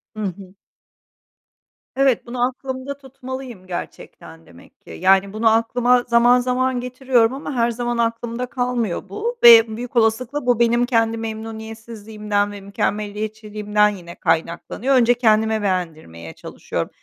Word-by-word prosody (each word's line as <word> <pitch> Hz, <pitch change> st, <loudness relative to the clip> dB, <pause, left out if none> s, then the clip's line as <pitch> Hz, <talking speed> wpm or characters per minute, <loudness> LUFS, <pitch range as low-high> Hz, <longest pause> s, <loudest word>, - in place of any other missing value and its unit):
Hı 215 Hz, -, -5 dB
hı. 190 Hz, 0 st, -7 dB, 1.4 s
Evet, 270 Hz, -3 st, +2 dB
bunu 245 Hz, +1 st, 0 dB
aklımda 260 Hz, +1 st, -6 dB
tutmalıyım 260 Hz, -6 st, -9 dB
gerçekten 80 Hz, -, -9 dB
demek 85 Hz, +1 st, -19 dB
ki. -, -, -19 dB
Yani, 195 Hz, -, +2 dB
bunu 220 Hz, +1 st, +2 dB
aklıma 245 Hz, +2 st, +2 dB
zaman 240 Hz, +1 st, +5 dB
zaman 250 Hz, 0 st, 0 dB
getiriyorum 250 Hz, -1 st, +1 dB
ama 280 Hz, +1 st, -6 dB
her 235 Hz, -1 st, +1 dB
zaman 240 Hz, 0 st, -3 dB
aklımda 235 Hz, +1 st, -2 dB
kalmıyor 245 Hz, -7 st, -3 dB
bu 470 Hz, -, -4 dB
ve 225 Hz, -2 st, +8 dB
büyük 245 Hz, +1 st, -7 dB
olasılıkla 240 Hz, +5 st, +1 dB
bu 245 Hz, -2 st, +2 dB
benim 235 Hz, +1 st, +3 dB
kendi 230 Hz, -2 st, +1 dB
memnuniyetsizliğimden 220 Hz, -2 st, -4 dB
ve 205 Hz, -1 st, -9 dB
mükemmeliyetçiliğimden 210 Hz, +1 st, -1 dB
yine 175 Hz, -4 st, -9 dB
kaynaklanıyor. 170 Hz, +10 st, -1 dB
Önce 245 Hz, -1 st, +5 dB
kendime 220 Hz, -2 st, +2 dB
beğendirmeye 160 Hz, -, -4 dB
çalışıyorum. -, -, -5 dB
230 Hz, 125 wpm, -20 LUFS, 210-245 Hz, 1.4 s, ve